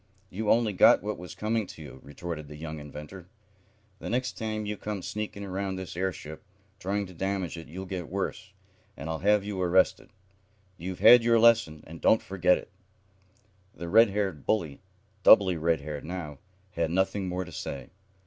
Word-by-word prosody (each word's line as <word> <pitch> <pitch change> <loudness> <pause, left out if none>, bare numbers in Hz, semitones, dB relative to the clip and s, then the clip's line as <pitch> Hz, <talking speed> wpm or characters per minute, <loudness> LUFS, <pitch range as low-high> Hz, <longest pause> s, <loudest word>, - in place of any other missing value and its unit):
"You 105 +2 -3
only 115 -2 +3
got 95 - +6
what 105 -2 -3
was 90 -2 -9
coming 110 -1 -1
to - - -11
you," 70 -3 -11
retorted 75 +1 -7
the 75 - -10
young 80 0 -6
inventor. 75 +5 -10 0.7
"The - - -6
next 125 +2 -1
time 110 -1 -3
you 105 0 -3
come 105 -2 -5
sneaking 105 -1 -5
around 95 0 -3
this 95 -2 -7
airship, 85 -4 -4 0.4
trying 100 +2 -1
to 90 - -12
damage 95 -1 -2
it, 85 -1 -9
you'll 95 +4 -7
get 90 -2 -5
worse, 95 +1 -4 0.5
and - - -7
I'll 80 - -3
have 105 +1 +3
you 100 -2 -4
arrested. 90 +1 +2 0.7
You've 90 +1 -6
had 120 -1 +9
your 115 0 +4
lesson, 110 -10 +4
and 80 +1 -11
don't 110 - +4
forget 90 -1 +2
it." - - -11 1.0
The 85 0 -6
red 115 +3 +6
haired 95 -7 -2
bully, 85 -10 -1 0.4
doubly 95 -2 +7
red 80 -1 +1
haired 75 0 -6
now, 80 -5 -6 0.3
had 85 -2 -1
nothing 95 +2 0
more 90 +1 -3
to 90 - -11
say. 70 -2 -6
95 Hz, 175 wpm, -28 LUFS, 80-105 Hz, 1.0 s, had